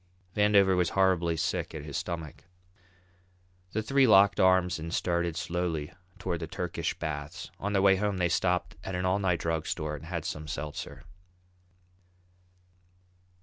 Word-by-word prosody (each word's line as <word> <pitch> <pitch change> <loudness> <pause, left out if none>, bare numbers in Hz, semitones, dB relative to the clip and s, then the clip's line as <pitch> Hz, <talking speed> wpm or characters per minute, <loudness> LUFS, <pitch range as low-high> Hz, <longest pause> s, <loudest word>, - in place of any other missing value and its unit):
Vandover 100 -2 +4
was 90 -2 +2
horribly 90 -3 +3
sick - - -2
at 75 - -6
his 75 -2 -7
stomach. 80 -2 -5 1.3
The 110 - -1
three 135 +3 +4
locked 100 -2 +6
arms 95 -2 +4
and 80 +1 -5
started 85 -2 0
slowly 85 -2 -2 0.2
toward 90 -3 -3
the 80 - -5
Turkish 85 -1 -3
baths. 75 -3 -5
On 100 +1 -2
their 95 -1 +3
way 95 -1 +6
they 95 -3 0
stopped 90 0 0
at 95 - -4
an 90 +1 -1
all 95 +2 +2
night 90 -4 +1
drug 80 -1 -1
store 75 -1 -2
and 75 - -10
had 85 -2 -4
some 75 -1 -4
seltzer. 75 +1 -6
90 Hz, 145 wpm, -29 LUFS, 80-95 Hz, 1.3 s, locked